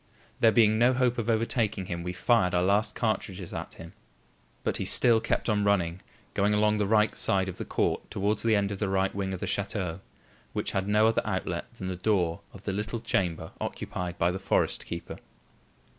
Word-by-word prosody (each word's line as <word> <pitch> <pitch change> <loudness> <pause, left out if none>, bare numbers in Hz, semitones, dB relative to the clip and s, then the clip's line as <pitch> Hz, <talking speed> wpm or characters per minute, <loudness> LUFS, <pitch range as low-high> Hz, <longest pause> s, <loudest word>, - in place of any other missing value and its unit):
There 115 - +6
being 110 -2 +4
no 120 +2 +5
hope 125 -1 +1
of 115 0 -2
overtaking 110 -3 0
him, 85 -1 -4
we 90 +1 -3
fired 90 -1 +2
our 90 - +3
last 100 +4 +2
cartridges 100 -5 -2
at - - -6
him. 85 +1 -11 0.7
But - - 0
he - - -2
still 115 -2 +5
kept - - -1
on 105 -2 +2
running, 95 -3 +1 0.3
going 105 +1 +2
along 105 0 +2
the 105 - +1
right 105 0 +3
side 95 -1 +2
of 95 - -6
the - - -4
court - - -1
towards 100 +2 -1
the 115 -1 +3
end 100 -1 +1
of 100 - -5
the 105 - -1
right 95 0 +1
wing 95 -1 -2
of 95 - -4
the - - -1
chateau, 95 -4 -2 0.5
which - - -2
had 95 0 -1
no 105 +1 +4
other 115 0 +3
outlet 95 -4 -3
than 95 - -7
the 95 - -3
door 90 -3 0
of 100 - -13
the 100 - -2
little 105 +3 -3
chamber 95 -7 -1
occupied 90 -1 -4
by 85 +1 +2
the 95 - -4
forest 95 - 0
keeper. 85 - -6
100 Hz, 205 wpm, -28 LUFS, 95-110 Hz, 0.7 s, There